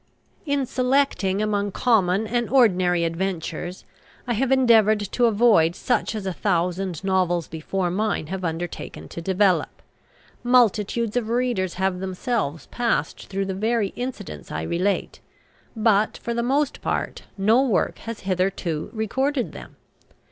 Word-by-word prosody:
In 285 -1 +1
selecting 250 -7 +1
among 205 -1 0
common 205 -4 +2
and 240 +1 -1
ordinary 185 -9 +3
adventures, 175 0 -3 0.4
I 245 - -1
have 260 +4 0
endeavoured 225 -5 +5
to 245 - +2
avoid 205 -7 +4
such 245 -3 -1
as 210 -3 -4
a 190 - -2
thousand 180 -2 -1
novels 180 -3 +1
before 175 +3 -2
mine 205 -3 -1
have 185 +4 -5
undertaken 170 +1 -5
to 170 - -7
develop. 190 +1 +1 0.6
Multitudes 235 -2 +2
of 235 -3 -1
readers 235 -7 0
have 190 0 0
themselves 185 - -2
passed 235 -10 -1
through 195 0 -2
the 190 - -3
very 215 +1 0
incidents 135 - -7
I 80 +1 -3
relate; 185 - -1 0.6
but, 215 -1 +2
for 235 - -4
the 235 - 0
most 275 +4 0
part, - - -3
no 215 +6 +4
work 255 -7 0
has 230 -1 -7
hitherto 185 -4 -1
recorded 260 +5 -1
them. - - -11
200 Hz, 135 wpm, -23 LUFS, 180-235 Hz, 0.6 s, endeavoured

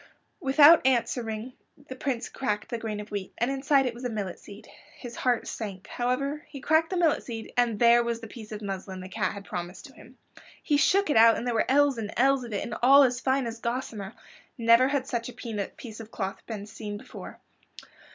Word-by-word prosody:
Without 295 +1 +7
answering, 235 -2 0 0.3
the 260 - -7
Prince 260 -2 -3
cracked 210 -6 -3
the 235 - -3
grain 215 -2 -4
of 210 0 -9
wheat, 200 -2 -5
and 240 +3 0
inside 275 0 +2
it 250 - -1
was 240 +2 -11
a 250 - -1
millet 205 -5 -4
seed. 205 +1 -13 0.3
His 240 -2 -9
heart 250 -2 0
sank. 195 -4 -6
However, 275 +5 -2
he 280 - -8
cracked 315 +4 +2
the 370 - -2
millet 335 -3 +2
seed, 225 -2 -7
and 240 -3 +2
there 235 +1 +6
was 235 -1 -2
the 230 - -9
piece 220 -1 -11
of 210 0 -6
muslin 190 -1 -5
the 185 - -9
cat 195 -1 -1
had 200 -1 -9
promised 175 +1 -6
to 275 - -14
him. 255 0 -17 0.5
He 295 - +2
shook 385 +4 +3
it - - +3
out 230 0 +7
and 235 - -4
there 245 - 0
were 225 - 0
ells 280 -2 +3
and 210 -1 -4
ells 270 +1 +3
of 235 - -8
it 205 - -2
and - - -6
all 275 +3 +8
as 250 -2 +1
fine 265 0 +1
as 230 0 -5
gossamer. 235 -5 -4 0.4
Never 230 +2 +5
had 275 -1 -1
such 235 -2 -3
a - - -9
piece 220 0 -6
of 220 -1 -9
cloth 195 -3 -5
been 210 -3 -5
seen 210 -1 -7
before. - - -11
235 Hz, 220 wpm, -27 LUFS, 215-265 Hz, 0.5 s, all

